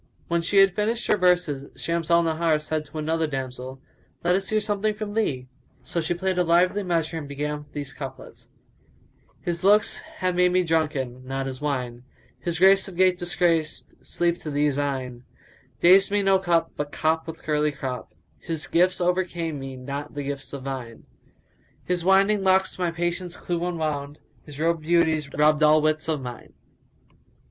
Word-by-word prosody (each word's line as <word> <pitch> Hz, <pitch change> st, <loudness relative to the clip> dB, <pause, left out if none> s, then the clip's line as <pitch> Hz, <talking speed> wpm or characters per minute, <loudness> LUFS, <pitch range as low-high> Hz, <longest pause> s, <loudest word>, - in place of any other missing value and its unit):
When 170 Hz, 0 st, +1 dB
she 180 Hz, +4 st, 0 dB
had 195 Hz, -1 st, +6 dB
finished 220 Hz, +3 st, -1 dB
her -, -, +6 dB
verses, 175 Hz, -7 st, +1 dB
Shams 170 Hz, -1 st, -2 dB
al 170 Hz, 0 st, +5 dB
Nahar 160 Hz, -1 st, +1 dB
said 155 Hz, 0 st, -3 dB
to 155 Hz, -, -10 dB
another 160 Hz, +1 st, 0 dB
damsel, 130 Hz, -1 st, -5 dB, 0.4 s
"Let 175 Hz, +1 st, +3 dB
us 195 Hz, +1 st, 0 dB
hear 215 Hz, -, +2 dB
something 210 Hz, 0 st, -1 dB
from 210 Hz, -1 st, -5 dB
thee!" 135 Hz, -13 st, -1 dB, 0.4 s
So 170 Hz, -, -2 dB
she 160 Hz, +2 st, -1 dB
played 185 Hz, +1 st, -1 dB
a -, -, +4 dB
lively 180 Hz, +4 st, +3 dB
measure 165 Hz, -3 st, -1 dB
and 145 Hz, -, -8 dB
began 150 Hz, +1 st, -4 dB
these 140 Hz, -2 st, -5 dB
couplets, 135 Hz, -2 st, -9 dB, 1.0 s
"His[FN#180] 170 Hz, 0 st, -2 dB
looks 205 Hz, +2 st, +4 dB, 0.2 s
have 185 Hz, -1 st, -1 dB
made 180 Hz, 0 st, +3 dB
me 185 Hz, 0 st, +3 dB
drunken, 150 Hz, -7 st, -1 dB
not 135 Hz, +1 st, -3 dB
his 130 Hz, 0 st, -5 dB
wine; 125 Hz, -5 st, -3 dB, 0.2 s
* -, -, -33 dB
His 170 Hz, -1 st, -3 dB
grace 190 Hz, +2 st, +5 dB
of 190 Hz, -, -9 dB
gait 185 Hz, 0 st, +3 dB
disgraced 170 Hz, -3 st, 0 dB
sleep 175 Hz, 0 st, 0 dB
to 155 Hz, -, -6 dB
these 145 Hz, -1 st, +1 dB
eyne: 130 Hz, -4 st, -3 dB, 0.6 s
Dazed 190 Hz, +3 st, +6 dB
me 205 Hz, 0 st, +1 dB
no 195 Hz, -1 st, +4 dB
cup, 170 Hz, -3 st, +1 dB
but 145 Hz, 0 st, -4 dB
cop 160 Hz, +2 st, 0 dB
with 165 Hz, 0 st, -8 dB
curly 150 Hz, 0 st, +1 dB
crop; 130 Hz, -3 st, -6 dB
* -, -, -37 dB
His 160 Hz, -2 st, -2 dB
gifts 180 Hz, +2 st, +2 dB
overcame 175 Hz, -4 st, -1 dB
me 135 Hz, -1 st, -7 dB
not 140 Hz, +4 st, -6 dB
the 145 Hz, -, -3 dB
gifts 140 Hz, 0 st, -5 dB
of 140 Hz, -2 st, -7 dB
vine: 130 Hz, -4 st, -6 dB, 0.8 s
His 180 Hz, -1 st, -1 dB
winding 195 Hz, +2 st, +4 dB
locks 190 Hz, 0 st, +2 dB
my 175 Hz, -1 st, +1 dB
patience 175 Hz, +1 st, -3 dB
clue 175 Hz, -1 st, -3 dB
unwound: 155 Hz, -4 st, -3 dB
* -, -, -34 dB
His 145 Hz, -1 st, -10 dB
robed 165 Hz, 0 st, +1 dB
beauties 160 Hz, -2 st, +2 dB
robbed 150 Hz, +1 st, +3 dB
all 155 Hz, 0 st, +6 dB
wits 155 Hz, +1 st, 0 dB
of 155 Hz, -3 st, -1 dB
mine." 125 Hz, -2 st, -9 dB
165 Hz, 180 wpm, -25 LUFS, 145-180 Hz, 1.0 s, had